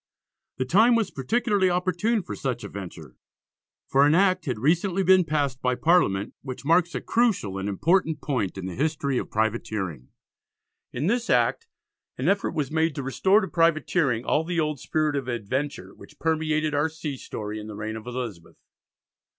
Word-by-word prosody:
The 130 Hz, -, -1 dB
time 220 Hz, -, +5 dB
was 225 Hz, -4 st, 0 dB
particularly 205 Hz, -, +1 dB
opportune 185 Hz, +5 st, 0 dB
for -, -, -6 dB
such 125 Hz, -3 st, -3 dB
a -, -, -5 dB
venture, 80 Hz, -10 st, -9 dB, 0.7 s
for 135 Hz, +1 st, +4 dB
an 150 Hz, -, +4 dB
Act 185 Hz, -1 st, +3 dB
had 125 Hz, -6 st, -2 dB
recently 175 Hz, -, +1 dB
been 185 Hz, 0 st, +6 dB
passed 145 Hz, -5 st, -1 dB
by 125 Hz, 0 st, +1 dB
Parliament 125 Hz, -, +2 dB
which 130 Hz, 0 st, -7 dB
marks 170 Hz, +2 st, +3 dB
a -, -, -2 dB
crucial 200 Hz, -, 0 dB
and 100 Hz, +1 st, -3 dB
important 160 Hz, -, +1 dB
point 125 Hz, -, -2 dB
in 95 Hz, -, -5 dB
the 95 Hz, -, -5 dB
history 140 Hz, -, -1 dB
of -, -, -6 dB
privateering. 105 Hz, -, -2 dB, 0.8 s
In 125 Hz, +5 st, -3 dB
this 235 Hz, +5 st, 0 dB
Act 460 Hz, -, +2 dB, 0.5 s
an -, -, -2 dB
effort 200 Hz, 0 st, +1 dB
was 145 Hz, -3 st, -2 dB
made 160 Hz, -1 st, +1 dB
to 140 Hz, -, -4 dB
restore 190 Hz, +10 st, +3 dB
to 190 Hz, -, -3 dB
privateering 165 Hz, -7 st, +1 dB
all 155 Hz, -, +2 dB
the 170 Hz, +1 st, -2 dB
old 150 Hz, -3 st, -1 dB
spirit 155 Hz, +1 st, 0 dB
of 135 Hz, -3 st, -3 dB
adventure 130 Hz, +5 st, -3 dB
which -, -, -16 dB
permeated 155 Hz, -1 st, 0 dB
our 145 Hz, +2 st, +1 dB
sea 155 Hz, -3 st, -5 dB
story 105 Hz, -4 st, -6 dB
in 105 Hz, -, -8 dB
the 105 Hz, -, -7 dB
reign 105 Hz, +1 st, -4 dB
of 110 Hz, +1 st, -9 dB
Elizabeth. 120 Hz, -9 st, -6 dB
150 Hz, 175 wpm, -25 LUFS, 120-175 Hz, 0.8 s, been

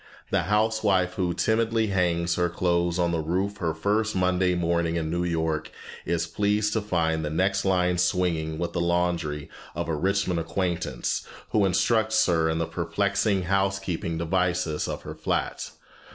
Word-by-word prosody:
The -, -, +3 dB
housewife 105 Hz, -4 st, +2 dB
who 90 Hz, -2 st, -1 dB
timidly 115 Hz, 0 st, +1 dB
hangs 85 Hz, -3 st, +1 dB
her 90 Hz, 0 st, +1 dB
clothes 85 Hz, 0 st, 0 dB
on 85 Hz, -1 st, +1 dB
the 85 Hz, -, 0 dB
roof 95 Hz, +6 st, -1 dB
her 80 Hz, -4 st, -2 dB
first 105 Hz, +6 st, 0 dB
Monday 90 Hz, 0 st, +2 dB
morning 85 Hz, -1 st, 0 dB
in 80 Hz, -2 st, -2 dB
New 85 Hz, +1 st, 0 dB
York 80 Hz, -3 st, -1 dB, 0.4 s
is 85 Hz, 0 st, 0 dB
pleased 105 Hz, +4 st, 0 dB
to 110 Hz, -, +1 dB
find 80 Hz, -5 st, 0 dB
the 75 Hz, -, -2 dB
next 95 Hz, +5 st, +1 dB
line 90 Hz, -2 st, +2 dB
swinging 85 Hz, -3 st, 0 dB
with 85 Hz, +1 st, -3 dB
the 85 Hz, -, 0 dB
laundry 85 Hz, -4 st, 0 dB, 0.3 s
of -, -, -3 dB
a 80 Hz, -, -1 dB
Richmond 95 Hz, +1 st, 0 dB
acquaintance, 85 Hz, -5 st, -2 dB, 0.2 s
who 105 Hz, -2 st, +3 dB
instructs 110 Hz, +4 st, +2 dB
her 80 Hz, -2 st, +2 dB
in 80 Hz, -, 0 dB
the 85 Hz, -, 0 dB
perplexing 100 Hz, +2 st, 0 dB
housekeeping 95 Hz, -3 st, -1 dB
devices 90 Hz, -1 st, 0 dB
of -, -, -5 dB
her -, -, -6 dB
flat. -, -, -2 dB
90 Hz, 160 wpm, -26 LUFS, 85-95 Hz, 0.4 s, The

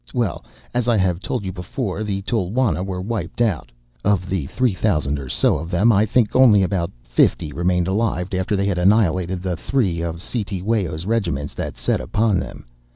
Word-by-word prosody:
Well, 120 Hz, -7 st, -1 dB, 0.3 s
as 120 Hz, -1 st, 0 dB
I 120 Hz, -2 st, +3 dB
have 90 Hz, -3 st, +1 dB
told 105 Hz, +1 st, -3 dB
you 95 Hz, -, -2 dB
before, 95 Hz, +3 st, -4 dB
the 100 Hz, -2 st, -3 dB
Tulwana 105 Hz, -3 st, 0 dB
were 95 Hz, -1 st, -4 dB
wiped 100 Hz, -4 st, -4 dB
out; 100 Hz, -, 0 dB, 0.3 s
of 95 Hz, -3 st, +1 dB
the 90 Hz, -7 st, -1 dB
three 125 Hz, -, +1 dB
thousand 75 Hz, -7 st, 0 dB
or 65 Hz, -2 st, -7 dB
so -, -, +2 dB
of 80 Hz, -, -6 dB
them 100 Hz, +6 st, +4 dB
I 105 Hz, +1 st, +3 dB
think 115 Hz, -1 st, +2 dB
only 115 Hz, -7 st, +6 dB
about 90 Hz, -2 st, 0 dB
fifty -, -, +1 dB
remained 90 Hz, +2 st, +1 dB
alive 95 Hz, -3 st, -1 dB
after 95 Hz, +3 st, 0 dB
they 100 Hz, 0 st, 0 dB
had 95 Hz, -3 st, 0 dB
annihilated 95 Hz, -2 st, +2 dB
the 90 Hz, -2 st, -1 dB
three 95 Hz, -5 st, 0 dB
of 85 Hz, 0 st, -3 dB
Cetewayo's 95 Hz, -6 st, -2 dB
regiments 100 Hz, -10 st, -1 dB
that -, -, -5 dB
set -, -, 0 dB
upon 105 Hz, -3 st, +1 dB
them. -, -, -7 dB
95 Hz, 185 wpm, -21 LUFS, 85-110 Hz, 0.3 s, only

